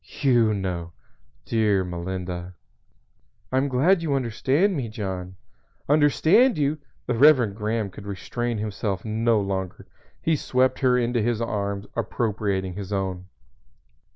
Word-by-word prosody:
you 120 -5 +4
know! 90 -4 -3 0.5
Dear 105 -4 +2
Melinda!" 90 0 -5 1.0
"I 130 - +1
am 135 +2 +2
glad 155 +8 +3
you 150 -4 0
understand 135 - +1
me, 130 -6 -3
John." 95 -4 -5 0.5
"Understand 160 - +4
you!" 150 +1 0 0.3
The 125 - -1
Reverend 125 -5 +5
Graham 110 -1 -2
could 100 +2 -11
restrain 120 +4 -3
himself 105 -2 -3
no 110 +1 +2
longer. 95 -2 -3 0.3
He 160 - +1
swept 130 -2 +1
her 125 -2 +3
into 120 -1 +1
his 115 0 0
arms, 100 -3 -2
appropriating 105 -5 -1
his 100 +1 -7
own. 95 -2 -3
110 Hz, 125 wpm, -24 LUFS, 95-130 Hz, 1.0 s, Reverend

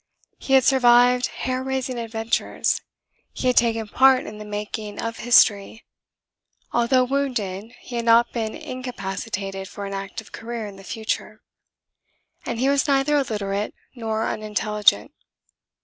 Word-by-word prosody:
He 270 - -2
had 265 -1 +6
survived 245 -1 +5
hair 255 0 -3
raising 260 -1 -3
adventures; 225 0 -1 0.5
he - - -5
had 250 -1 +3
taken 225 -2 +2
part 260 +3 +4
in 210 0 -8
the 210 - -8
making 210 0 -5
of 230 0 -4
history; 220 -2 +3 0.9
although 240 +2 +3
wounded 245 -5 -2
he 240 - -6
had 235 - -2
not 235 +1 +5
been 220 -2 -3
incapacitated 195 -5 -5
for 200 - -7
an 200 - -5
active 195 +2 -6
career 230 -1 -6
in 200 -2 -9
the 195 - -13
future; 220 +3 -4 1.0
and 235 -1 -3
he 260 - +2
was 280 +2 +2
neither 280 +1 +2
illiterate 210 -6 -1 0.2
nor 225 -2 -2
unintelligent. 210 - +1
230 Hz, 135 wpm, -23 LUFS, 210-255 Hz, 1.0 s, had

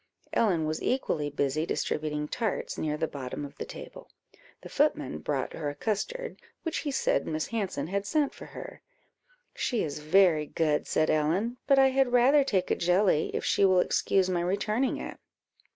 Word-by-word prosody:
Ellen 180 -8 +2
was 155 +1 -2
equally 165 - 0
busy 145 +1 0
distributing 150 -2 -2
tarts 220 +4 -2
near 150 -1 -2
the 160 +1 -1
bottom 140 0 -6
of 140 - -11
the - - -3
table. - - -10 0.5
The - - -9
footman 75 - 0
brought 135 - -2
her 150 -3 -3
a 145 - -6
custard, 470 - -3 0.2
which 325 - -2
he 295 - -3
said 265 - 0
Miss 155 -1 -1
Hanson 200 -10 -2
had 200 +4 -2
sent 300 -3 +1
for - - -11
her. - - -9 0.7
"She 240 -4 -1
is 150 -1 -4
very 155 -1 +4
good," 150 -2 0
said 155 - +2
Ellen, 175 +11 0
"but 275 -1 +5
I 270 0 +6
had 265 -2 +1
rather 265 +4 +5
take 190 -9 0
a - - +3
jelly, 180 -2 +2
if - - -2
she - - +2
will 185 -2 +5
excuse 190 +1 +2
my 180 -2 0
returning 210 +8 0
it." - - -7
180 Hz, 180 wpm, -28 LUFS, 150-235 Hz, 0.7 s, I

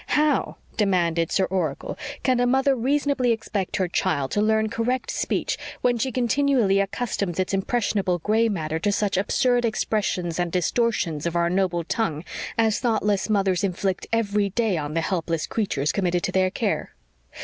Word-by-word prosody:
"How," 300 0 +2 0.2
demanded 170 -6 +1
Sir 190 - +2
Oracle, 175 -7 -2 0.3
"can 255 -2 +2
a 245 - +3
mother 265 +2 +3
reasonably 270 0 +1
expect 215 -4 -2
her 185 - +1
child 155 -6 0
to 205 - +1
learn 220 0 +2
correct 235 +3 -1
speech, - - -1 0.2
when 245 -1 +2
she 260 +3 0
continually 245 -4 +2
accustoms 200 -3 -2
its 185 +1 -1
impressionable 195 -2 0
gray 220 +6 +2
matter 160 -5 -2
to 205 +5 +1
such 200 -1 0
absurd 245 +5 +2
expressions 200 -6 -1
and 175 -1 0
distortions 180 -4 0
of 170 - -3
our 170 0 +2
noble 180 -2 +1
tongue 170 -5 -2 0.3
as 225 -1 +2
thoughtless 210 -4 0
mothers 195 -2 +1
inflict 190 0 -1
every 210 -3 +1
day 220 -1 0
on 150 -1 -3
the 165 - +2
helpless 165 -3 -1
creatures 155 -10 -1
committed 180 -3 0
to - - -1
their 185 0 +2
care? - - -2
200 Hz, 160 wpm, -24 LUFS, 175-230 Hz, 0.3 s, a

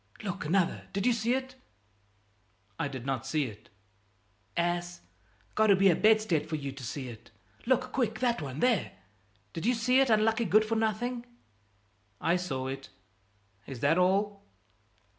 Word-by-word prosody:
Look, 185 -6 -4
another! 175 +2 +1
Did 200 0 -1
you 250 - +4
see 230 +2 +1
it?" 260 0 -4 1.3
"I 165 - 0
did 130 -3 -7
not 135 -3 -2
see 150 +1 +1
it." 110 -3 -10 0.9
"Ass! 175 0 -1 0.5
Got 220 0 +3
to 200 - +6
be 195 0 +5
a - - +2
bedstead 215 -8 +3
for 160 - -1
you 140 -2 -4
to 135 -1 -10
see 130 +2 -5
it! 115 -3 -11 0.4
Look, 255 0 +2
quick, 225 -4 0
that 240 -6 +1
one, 140 0 -5
there! 240 -7 +2 0.6
Did 165 +6 -3
you 250 - +3
see 250 +3 +3
it, 270 -2 +3
unlucky 225 +1 +3
good 215 +3 +4
for 225 +1 -1
nothing?" 235 +3 -1 0.9
"I 170 - +2
saw 135 -8 -3
it; 135 0 -6 0.8
is 130 -3 -7
that 155 +5 +3
all?" 200 +2 +1
195 Hz, 160 wpm, -30 LUFS, 150-225 Hz, 1.3 s, to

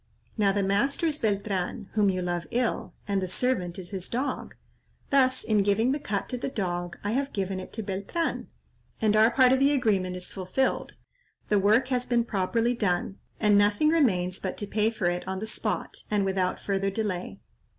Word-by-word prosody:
Now 205 -3 +3
the 200 0 0
master 205 - +1
is 305 -2 0
Beltran, 200 -1 -1
whom 210 -2 +3
you 185 -1 -1
love 175 -2 -2
ill, 245 0 -1
and 200 -1 0
the 185 - -2
servant 185 -4 0
is 180 -2 -7
his 190 -2 -4
dog; 260 +4 -3 0.6
thus 260 -2 +3
in 215 -2 +2
giving 205 +5 +2
the 290 - -1
cut 205 -7 -3
to 250 - -3
the 250 - -2
dog 175 -6 -3
I 205 - -1
have 275 +4 -1
given 190 -1 -2
it 185 - -9
to 220 - -4
Beltran, 200 - -2 0.5
and 215 -1 +2
our 220 +1 +6
part 255 +1 +5
of 265 - +3
the 280 +2 +4
agreement 200 -9 +1
is 180 0 -4
fulfilled; 190 +8 -1 0.5
the 210 - +4
work 220 +6 +3
has 250 -1 0
been 235 -1 +2
properly 230 +3 0
done, 190 -4 -1 0.2
and 205 -2 +5
nothing 205 +9 +3
remains 190 - +2
but 190 - -4
to 205 - -3
pay 210 +2 +1
for 215 -5 -4
it 175 +1 0
on 190 0 -2
the 210 - -4
spot 220 - -3
and 205 -2 +1
without 190 -1 0
further 195 0 -1
delay." 190 - -3
205 Hz, 195 wpm, -27 LUFS, 190-240 Hz, 0.6 s, our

